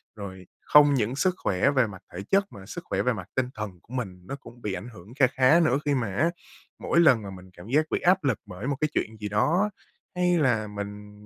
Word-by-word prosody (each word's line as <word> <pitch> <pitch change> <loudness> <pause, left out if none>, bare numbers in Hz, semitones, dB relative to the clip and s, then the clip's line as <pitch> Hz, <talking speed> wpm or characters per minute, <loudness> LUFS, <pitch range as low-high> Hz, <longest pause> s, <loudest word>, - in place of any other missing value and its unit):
Rồi 95 -3 -9
không 145 -1 +6
những 120 -1 0
sức 185 +6 +1
khỏe 100 +9 +1
về 130 -5 +3
mặt 95 -1 -10
thể 90 - -5
chất, 195 0 +3
mà 95 - -11
sức - - -7
khỏe - - -1
về - - +1
mặt - - -7
tinh 130 -1 0
thần 105 -4 -6
của 120 - -15
mình 95 -8 -4
nó 135 - -4
cũng 120 -3 -14
bị 105 -4 -3
ảnh 120 - -6
hưởng 100 +4 -13
kha 135 -2 +5
khá 135 +6 +4
nữa, 145 -5 +3
khi 145 - +2
mà 115 -6 -2
á 155 +10 +3 0.5
mỗi 170 - +1
lần 130 -9 +6
mà 100 - -6
mình 95 -1 -11
cảm 90 +4 -11
giác 150 +5 +2
bị - - +1
áp 180 0 +3
lực 135 -7 +1
bởi 95 +6 -7
một 145 - 0
cái 155 - +2
chuyện 110 0 -2
gì 105 - -4
đó, 165 - +2 0.5
hay 180 -1 +2
là 120 -7 +2
mình, 105 0 -7
120 Hz, 250 wpm, -26 LUFS, 100-145 Hz, 0.5 s, không